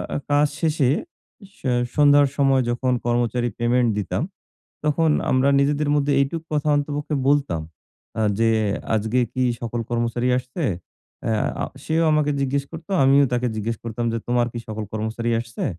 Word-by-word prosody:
আ - - +1
কাজ 145 +1 +4
শেষে 155 -5 +2 0.5
এ - - -12 0.5
সন্ধ্যার 145 -1 +6
সময় 135 -2 +3
যখন 125 +2 0
কর্মচারী 120 0 0
পেমেন্ট 120 0 +2
দিতাম, 105 +5 -2 0.6
তখন 155 +2 +2 0.2
আমরা 130 +1 +3
নিজেদের 145 +1 +1
মধ্যে 145 0 +2
এইটুকু 155 +4 -1
কথা 150 0 0
অন্তপক্ষে 145 +1 -2
বলতাম 140 - +1 0.6
আ - - +2 0.2
যে 115 0 +3 0.5
"আজকে 110 +3 0
কি 130 - -1 0.2
সকল 120 0 -3
কর্মচারী 120 +1 0
আসছে?" 130 +6 -5 0.6
আ 110 -1 -1 0.2
সেও 160 +1 +1
আমাকে 150 -1 +2
জিজ্ঞেস 140 +1 0
করত। 160 0 -10 0.2
আমিও 140 +1 +6
তাকে 125 0 +1
জিজ্ঞেস 115 +2 -2
করতাম 115 +1 -3
যে, 115 - -1
"তোমার 120 0 +2
কি 120 - -5
সকল 110 0 -4
কর্মচারী 110 +2 -2
আসছে?" 115 -1 -6
130 Hz, 150 wpm, -22 LUFS, 120-145 Hz, 0.6 s, সন্ধ্যার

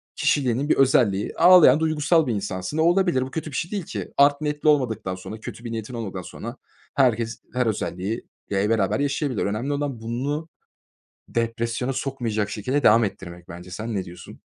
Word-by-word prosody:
kişiliğinin 135 0 +1
bir - - +5
özelliği, 120 -7 +3
ağlayan 170 -6 +7
duygusal 160 0 +2
bir 120 - 0
insansın 95 +5 -4
ve - - +2
olabilir 175 -4 +3
bu 130 +1 -4
kötü 160 0 -4
bir - - -7
şey 170 - -2
değil 205 -3 -2
ki. - - -6
Art 140 +1 +5
niyetli 150 0 0
olmadıktan 115 -10 +1
sonra, 100 +4 -8
kötü 115 - -9
bir 115 - -5
niyetin 115 +2 -5
olmadan 100 -6 -5
sonra 115 +7 -8 0.4
herkes 120 -4 +1
her 125 0 +1
özelliği, 105 0 -3 0.2
ya, 95 -1 +1
i 105 - 0
beraber 110 -1 +1
yaşayabilir. 140 -3 -1
Önemli 110 +8 -2
olan 140 -4 -3
bunu 140 +8 -3 0.8
depresyona 115 +2 -2
sokmayacak 120 -6 -2
şekilde 130 +8 -1
devam 115 +1 +6
ettirmek 90 -4 -6
bence. 90 +1 -10
Sen 110 +5 -4
ne 95 - -1
diyorsun? 90 -1 -12
120 Hz, 180 wpm, -24 LUFS, 105-145 Hz, 0.8 s, ağlayan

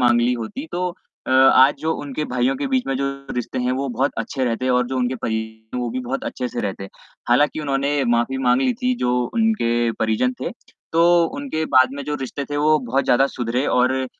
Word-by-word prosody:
माँग 120 -1 +4
ली 120 +1 +2
होती 125 - -5
तो 180 +1 -1 0.4
अ, - - -3
आज 130 +1 +6
जो 160 +1 0
उनके 145 +1 -4
भाइयों 125 0 0
के - - -2
बीच 260 -1 0
में 135 - -1
जो 140 +1 -1 0.3
रिश्ते 125 0 -3
हैं 125 0 0
वो 135 +1 -2
बहुत 130 +4 0
अच्छे 130 - -2
रहते 125 +1 -1
और 125 -1 +2
जो 130 - -3
उनके 125 +1 0
परिजन 110 +1 -4
वो 120 -1 -2
भी 130 +2 -3
बहुत 130 +2 -4
अच्छे 125 -1 -3
से - - -4
रहते। 95 -1 -4 0.4
हालाँकि 145 +5 +3
उन्होंने 140 0 0
माफ़ी 120 +3 +1
माँग 125 -1 +3
ली 255 - +2
थी, 255 +2 0
जो 125 - 0
उनके 120 - +1
परिजन 110 +3 +1
थे, - - -3 0.4
तो 170 +1 +5
उनके 275 - -3
बाद 130 0 +6
में 140 - -5
जो 150 - -3
रिश्ते 135 +2 -4
थे 145 - -2
वो 155 +1 +3
बहुत 130 +1 -1
ज़्यादा 135 +3 +4
सुधरे 125 +1 -2
और 130 +1 +2
130 Hz, 215 wpm, -21 LUFS, 120-145 Hz, 0.4 s, आज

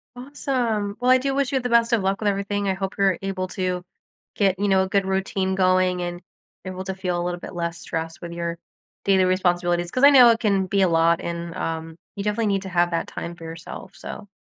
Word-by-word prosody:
Awesome. 245 -6 -2
Well, 250 +1 +1
I 255 - +7
do 270 +1 -1
wish 275 -1 0
you 265 - +2
the 245 - -2
best 235 0 +3
of 220 -4 +2
luck 195 +1 0
with 215 - -1
everything. 200 0 -1
I 190 - +2
hope 195 +1 -4
you're 195 -3 +3
able 195 -1 -3
to 180 -1 -2 0.5
get, 195 -2 +2
you 205 - +1
know, 190 -1 +4
a 190 - -4
good 200 0 +1
routine 190 0 -1
going 185 -1 +2
and 175 0 -4 0.4
able 185 0 -5
to 190 0 -4
feel 180 -2 -2
a - - -2
little 175 0 -3
bit - - -9
less 170 -1 -3
stress 165 -1 -5
with 170 -1 -7
your 170 0 -3 0.5
daily 190 -1 +4
responsibilities. 175 -2 +1
'Cause 255 +8 -2
I 285 - +10
know 255 -4 +8
it 230 -1 +3
can 200 -3 +2
be 200 +1 +1
a 190 - +4
lot, 165 0 +3
and, 170 0 -5
um, 160 0 -4 0.2
you 200 - -4
definitely 210 +1 0
need 195 -1 +1
to 190 - -6
have 175 -1 +2
that 165 - -1
time 170 0 -6
for 165 - -11
yourself, 165 0 -9
so 205 - -8
190 Hz, 235 wpm, -23 LUFS, 175-205 Hz, 0.5 s, I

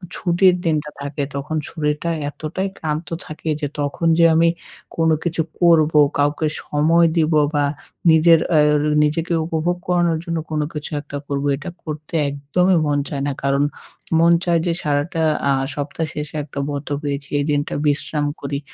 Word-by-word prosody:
ছুটির 180 +1 +3
দিনটা 150 -2 0
থাকে 140 0 -3
তখন 145 +3 -3
শরীরটা 150 +1 -2 0.2
এতটাই 165 +6 -4
ক্লান্ত 155 +1 -3 0.2
থাকে 155 +1 -6
যে 145 - 0
তখন 145 +3 -1
যে 170 - +7
আমি 165 +1 +5 0.5
কোনো 165 -1 +3
কিছু 165 -1 0 0.2
করবো, 160 -3 +5 0.2
কাউকে 145 +2 +1 0.2
সময় 165 +3 +3
দিবো 155 -1 +3
বা 145 -1 +2 0.5
নিজের 165 +1 +6 0.2
এর 150 0 +4 0.2
নিজেকে 165 +3 0
উপভোগ 170 +2 -1
করানোর 175 -2 +2
জন্য 170 -2 -2
কোনো 150 -1 0
কিছু 150 -1 -5
একটা 145 -1 -7
করবো, 140 0 -1
এটা 145 +5 -7
করতে 155 0 -7 0.2
একদমই 165 +6 +1
মন 145 -1 +1
চায় 140 -2 -3
না। - - 0
কারণ 140 +1 +2 0.6
মন 170 +1 +5
চায় 170 -2 +2
যে 170 - +1
সারাটা 150 +3 -1 0.3
আ - - +4 0.2
সপ্তাহ 145 +3 -3
শেষে 150 0 -6
একটা 140 -1 -7
বন্ধ 145 0 -4
পেয়েছি 140 -1 -3
এই 140 - 0
দিনটা 145 0 -1
বিশ্রাম 145 +1 0 0.2
করি। 140 0 -3
155 Hz, 160 wpm, -20 LUFS, 145-165 Hz, 0.6 s, যে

